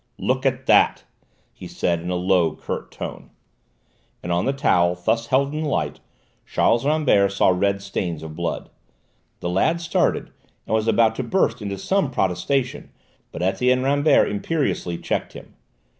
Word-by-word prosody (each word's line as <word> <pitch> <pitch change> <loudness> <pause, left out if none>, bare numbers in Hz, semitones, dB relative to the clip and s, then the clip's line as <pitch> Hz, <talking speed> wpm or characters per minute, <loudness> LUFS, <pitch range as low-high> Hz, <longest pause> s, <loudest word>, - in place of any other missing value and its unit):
"Look 130 +1 0
at 130 0 -2
that!" - - +4 0.5
he - - -10
said 85 -1 -1
in 85 - -5
a 90 - -1
low, 90 -3 +2
curt - - -6
tone. - - -8 0.9
And 85 - -3
on 85 +1 +1
the 135 - +2
towel, 90 -10 +2
thus 110 +6 -1
held 140 +2 +1
in 155 - -3
the 155 - -1
light, - - -2 0.4
Charles 115 +2 +1
Rambert 145 -11 +3
saw 100 - +3
red 100 +2 +1
stains 85 -5 -4
of 80 -1 -8
blood. 85 +1 -4 0.7
The 85 - -2
lad 155 - +1
started, 165 -1 0 0.3
and - - -3
was 110 0 +1
about 115 -1 +4
to 130 - -2
burst 125 -2 0
into 100 -1 -4
some 190 - 0
protestation, 125 +5 -1 0.4
but 85 - -5
Etienne 125 +8 +2
Rambert 145 +3 +3
imperiously 105 - -2
checked - - -3
him. - - -12
110 Hz, 160 wpm, -22 LUFS, 90-135 Hz, 0.9 s, that